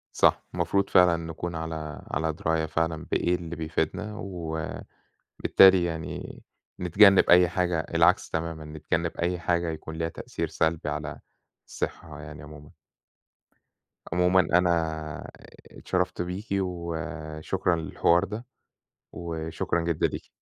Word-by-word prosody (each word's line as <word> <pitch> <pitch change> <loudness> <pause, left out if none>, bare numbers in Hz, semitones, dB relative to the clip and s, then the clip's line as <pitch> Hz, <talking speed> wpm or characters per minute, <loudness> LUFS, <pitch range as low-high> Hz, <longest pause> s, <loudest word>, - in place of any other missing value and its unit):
صح - - +3
المفروض 95 +3 0
فعلًا 90 -2 +5
نكون 85 +1 -5
على 80 -3 -5
على 80 +2 0
دراية 80 0 0
فعلًا 80 0 -1
بإيه 90 +1 +2
اللي 85 -1 -6
بيفيدنا، 80 +6 -2
وبالتالي 80 -6 -6 0.9
يعني 80 -2 -5 0.4
نتجنّب 95 +2 +6
أي 90 -1 +7
حاجة 90 -2 0
العكس 80 - +2
تمامًا، 80 -1 -3
نتجنّب 80 +2 -2
أي 90 +1 -1
حاجة 85 0 0
يكون 80 0 -6
ليها 80 0 -2
تأثير - - -4
سلبي 80 -1 0
على 75 0 -4 0.5
الصحّة 75 -2 -5
يعني 75 0 -10
عمومًا. 75 0 -12 1.4
عمومًا 90 +1 +4
أنا 90 0 +3 1.0
اتشرّفت 90 -1 -2
بيكِ 90 +4 -4
وشكرًا 80 -1 -2
للحوار 85 +1 +2
ده 110 +5 -5 0.7
وشكرًا 80 0 -3
جدًا 85 -1 +1
ليكِ. - - -7
85 Hz, 115 wpm, -27 LUFS, 80-90 Hz, 1.4 s, أي